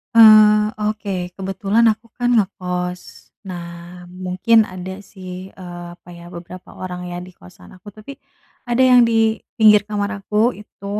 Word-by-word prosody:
Eee, 215 -1 +7 0.2
oke 215 -1 -6 0.3
kebetulan 195 +4 0
aku 220 +2 -24
kan 245 0 0
ngekos, 180 -4 -3 0.2
nah 175 -2 -7 0.4
mungkin 185 +5 0
ada 185 -1 -8
sih, 185 -2 -12 0.2
eee, 175 -1 -9
apa 175 - -19
ya 170 - -13
beberapa 175 +1 -11
orang 180 -1 -6
ya 175 - -6
di 180 - -11
kosan 90 0 -17
aku, 200 +2 -13
tapi 215 +6 -11 0.5
ada 240 +2 +2
yang 250 -2 +6
di - - 0 0.4
pinggir 210 -2 +6
kamar 205 -1 -2
aku 210 +2 -5 0.2
itu, 210 -1 -15
195 Hz, 145 wpm, -19 LUFS, 180-215 Hz, 0.5 s, Eee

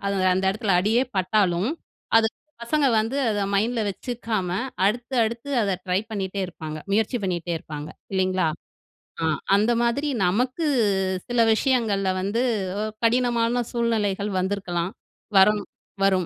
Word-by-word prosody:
அது 200 - 0 0.2
அந்த 190 +1 0
இடத்துல 200 -1 0
அடியே 220 +6 +2
பட்டாலும், 190 +2 +2 0.5
அது 225 0 +5 0.4
பசங்க 290 +4 +1
வந்து 225 +5 -2
அத 205 -1 -1
மைண்டில 225 +4 +1
வெச்சுக்காம 220 -2 -3 0.4
அடுத்து, 240 +5 -1
அடுத்து 235 +5 -4
அத 200 - 0 0.2
ட்ரை 180 +1 +2
பண்ணிட்டே 195 -2 -3
இருப்பாங்க, 155 -3 -7
முயற்சி 220 +4 +1
பண்ணிட்டே 175 -2 -2
இருப்பாங்க 150 -1 -7 0.2
இல்லிங்களா? 185 -2 +1 0.8
அ - - -1 0.3
அந்த 215 +4 +3
மாதிரி 280 +5 0 0.2
நமக்கு 250 - 0 0.6
சில 245 -1 -1
விஷயங்கள்ல 220 -6 +1
வந்து, 205 +5 0 0.4
அ - - -1 0.2
கடினமான 240 0 +2
சூழ்நிலைகள் 210 -4 0
வந்திருக்கலாம், 185 -2 -2 0.5
வரணும் 205 +1 +4 0.3
வரும். 190 -2 +3
210 Hz, 125 wpm, -24 LUFS, 190-235 Hz, 0.8 s, அது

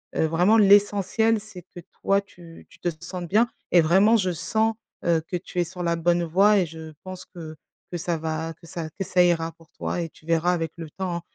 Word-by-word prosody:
heu - - +2
vraiment 180 +8 +3
l'essentiel 205 +2 +4
c'est 205 -4 -12
que - - -9 0.2
toi 195 0 +3
tu 170 -4 -15
tu - - -19
te 175 - -1
sentes 180 0 -6
bien 220 +7 +3 0.2
et 175 - +6
vraiment 195 +8 +5
je 185 -4 0
sens, 220 +6 0 0.3
heu, 170 -2 +3
que 180 - -4
tu 180 0 -6
es - - +4
sur 180 +1 -8
la 170 -1 +1
bonne 170 +1 +1
voie 195 +5 +4
et 180 - +2
je 160 0 -9
pense 185 -1 -8
que 160 -3 -10 0.4
que 175 - -3
ça 170 0 -2
va 160 +1 -3
que 170 +1 -18
ça 165 -1 -5
que - - 0
ça 180 0 +3
ira 165 -2 +1
pour 165 -2 -22
toi 175 - -3
et 165 - -4
tu 155 - -22
verras, 165 +2 +2
avec 165 -3 -2
le 165 -2 -7
temps, 185 0 -3
hein, 170 - -6
175 Hz, 235 wpm, -24 LUFS, 165-195 Hz, 0.4 s, et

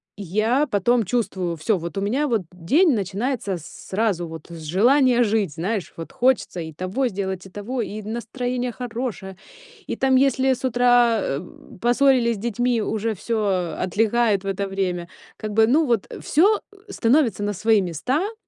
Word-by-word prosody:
я 215 - 0
потом 230 +2 +2
чувствую: 190 -6 -1
всё, 190 +6 +1
вот 170 +4 -6
у 195 - 0
меня, 265 +9 0
вот 225 -5 +1
день 270 - +3
начинается 200 0 -2
сразу, 185 +2 -3
вот 160 -1 -9
с 165 -1 -9
желания 245 - +3
жить, 210 -7 0
знаешь, 190 +3 -3
вот 165 - -7
хочется 250 -7 +1
и 160 -1 -6
того 185 - -2
сделать, 190 -3 -4
и - - -15
того, 225 +6 -4
и 215 -1 -5
настроение 245 +3 -3
хорошее, 230 -6 -5 0.5
и - - -2
там, 265 -1 +3
если 265 0 +3
с 255 - -8
утра, 245 -2 +4
эм, 160 +5 -6
поссорились 245 -1 +3
с - - -8
детьми, 240 +2 0
уже 220 +1 -2
всё 195 -5 -1
отлегает 210 +2 +1
в - - -6
это 195 0 -2
время. 180 -3 -2 0.3
Как 215 -1 -5
бы, 220 +1 +5
ну, 300 +7 +3
вот, 230 -5 +1
э, - - -8
всё, 395 +8 +3
э, 405 0 -15
становится 235 - +2
на 205 - -1
свои 215 +2 +3
места. 255 - -2
220 Hz, 170 wpm, -23 LUFS, 190-245 Hz, 0.5 s, бы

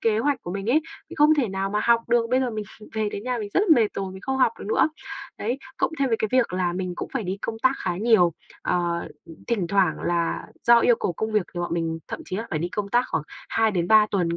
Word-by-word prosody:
kế 220 -1 +2
hoạch 285 +3 0
của 175 - -6
mình 195 +1 -4
ấy, 305 - +4 0.3
mình - - -9
không 300 +1 +6
thể 265 -8 +1
nào 195 +1 -2
mà 210 - 0
học 235 -1 +5
được. 235 -1 +3
Bây 255 +1 +3
giờ 255 - 0
mình 215 -2 -4 0.3
về 215 -1 0
đến 205 +1 -6
nhà 250 -1 -1
mình 210 -2 -4
rất - - +4
là 425 - +1
mệt 220 -3 +3
rồi, 190 -1 -4
mình 190 - -10
không 265 0 -1
học 245 -3 +4
được - - -8
nữa. 220 - +3 0.5
Đấy, 240 +5 -2 0.2
cộng - - +1
thêm 275 - +2
với 225 - +2
cái 220 - +1
việc 255 -6 +3
là 180 -1 0
mình 180 0 -3
cũng - - -5
phải 265 - 0
đi 185 +1 -2
công 225 -1 -3
tác 260 - +5
khá 175 -1 -3
nhiều. 200 -6 +4 0.3
Ờ, 170 -1 -1 0.4
thỉnh 210 -7 0
thoảng 195 +1 +1
là 170 -1 -1 0.2
do 235 0 +7
yêu 235 0 +4
cầu 175 - 0
công 220 +5 -3
việc 210 -3 +3
thì 175 - -3
bọn 175 -1 -2
mình 165 -1 -2
thậm - - -5
chí 185 - -4
là 225 +3 -4
phải 155 - -1
đi 170 +3 -2
công 205 +1 -3
tác 240 +4 +3
khoảng - - -1 0.3
2 225 -1 +2
đến 175 -3 -1
3 215 -1 +7
tuần 170 -4 0
210 Hz, 280 wpm, -24 LUFS, 180-235 Hz, 0.5 s, do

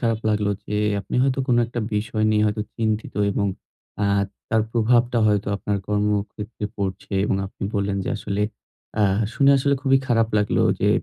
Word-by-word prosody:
খারাপ 115 -3 +1
লাগলো 105 -1 +1 0.2
যে 105 - -3 0.3
আপনি 95 - -8
হয়তো 135 0 +1
কোনো 120 - +4
একটা 120 0 -4
বিষয় 110 +1 -1
নিয়ে 105 0 +3
হয়তো 105 0 -1
চিন্তিত। 110 -1 -1 0.2
এবং 100 +1 0 0.6
আ - - +3 0.4
তার 110 -1 +2
প্রভাবটা 120 +1 +3
হয়তো 105 -1 +1
আপনার 100 0 -2
কর্মক্ষেত্রে 105 +1 -2
পড়ছে 95 0 -4
এবং 100 - +1
আপনি 95 - -12
বললেন 100 -1 0
যে, - - -4
আসলে 100 0 -3 0.6
আ - - +5 0.3
শুনে 140 0 +5
আসলে 140 +1 +2
খুবই 135 -1 +4
খারাপ 115 -2 +2
লাগলো 105 - +1 0.2
যে - - +3
105 Hz, 170 wpm, -23 LUFS, 105-120 Hz, 0.6 s, আ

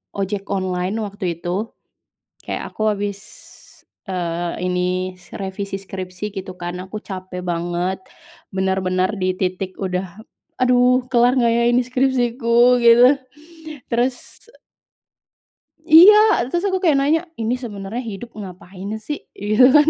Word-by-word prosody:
ojek 200 0 -3
online 185 -1 -1
waktu 195 -5 -4
itu. 185 +6 -3 0.7
Kayak - - -5
aku 215 0 +1
habis, 200 0 -4 0.9
eee, 175 -2 -2
ini, 180 +1 -1 0.2
revisi 195 0 -4
skripsi, 190 +1 -6
gitu, 190 -1 -6
kan. 175 +1 -5
Aku 190 +3 -7
capek 185 -2 -7
banget, 175 +2 -2 0.5
benar-benar 190 0 0
di 185 -1 0
titik 185 0 -3
udah, 185 0 -3 0.4
"Aduh, 250 0 +4
kelar 245 +1 +4
enggak, 235 -1 +3
ya, 235 - +2
ini 245 +1 +3
skripsiku?" 245 -1 +3
Gitu. 235 +2 +8 0.8
Terus 245 - -2 1.4
Iya. 335 +6 +9 0.3
Terus, 345 +6 -1
aku 380 -1 0
kayak 320 -6 +4
nanya, 300 +4 +2 0.2
"Ini 225 +2 0
sebenarnya 220 -1 -6
hidup 225 +4 -8
ngapain, 190 0 -8
sih?" 295 +4 -4 0.2
Gitu, 215 +4 +3
kan. 300 0 +6
200 Hz, 120 wpm, -20 LUFS, 185-245 Hz, 1.4 s, Iya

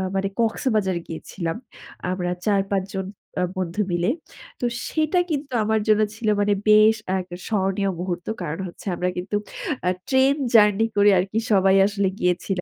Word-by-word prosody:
মানে 195 0 +1
কক্সবাজার 220 -5 +1
গিয়েছিলাম। 165 +1 -5 0.5
আমরা 180 -1 -2 0.2
৪-৫ 195 -2 +1
জন 190 0 -2 0.4
আ - - +2
বন্ধু 185 +2 -2
মিলে। 175 +3 +1 0.5
তো - - -1 0.2
সেটা 315 +3 +1
কিন্তু 285 -3 -3
আমার 220 +1 +1
জন্য 215 0 +4
ছিল 220 0 -4
মানে 205 0 +3 0.2
বেশ 215 +1 +7 0.2
আরেকটা 185 -2 -3
স্মরণীয় 195 -1 0
মুহূর্ত। 175 -1 -3 0.2
কারণ 165 0 -4
হচ্ছে 175 - -12
আমরা 180 +1 -1
কিন্তু 185 +3 -3 0.5
আ - - +5 0.2
ট্রেন 265 +1 +4 0.2
জার্নি 210 -1 +5
করে 205 0 +5
আরকি 195 +4 -1
সবাই 190 -1 +5
আসলে 200 -1 0
গিয়েছিলা 180 +1 0
195 Hz, 150 wpm, -23 LUFS, 180-215 Hz, 0.5 s, বেশ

